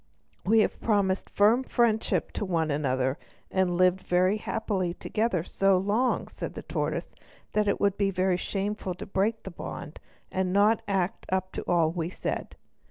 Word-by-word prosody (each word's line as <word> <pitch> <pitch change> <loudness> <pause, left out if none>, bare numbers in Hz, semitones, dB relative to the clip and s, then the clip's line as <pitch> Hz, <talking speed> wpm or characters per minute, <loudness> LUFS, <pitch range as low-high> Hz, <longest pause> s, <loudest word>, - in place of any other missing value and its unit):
"We 220 +3 +5
have - - -1
promised 200 -4 +1
firm 215 +5 +4
friendship 235 -3 +1
to - - -3
one 165 -5 0
another 130 -1 0 0.3
and 185 -2 +1
lived 185 +1 +4
very 185 +3 +2
happily 200 -5 -2
together 215 -6 -1
so 195 +1 +2
long," 210 +7 +1
said - - -6
the - - -6
tortoise, - - -3 0.4
"that 210 -1 +2
it 200 - +1
would 200 -1 +2
be 200 -1 +2 0.2
shameful 195 0 -3
to - - -7
break 210 +4 0
the 190 - -7
bond 160 -2 -7 0.3
and 185 -1 0
not 205 +3 +4
act 195 +1 -1
up 185 0 0
to - - -4
all 165 -2 +3
we 165 -1 -2
said. - - -4
190 Hz, 165 wpm, -28 LUFS, 180-210 Hz, 0.4 s, We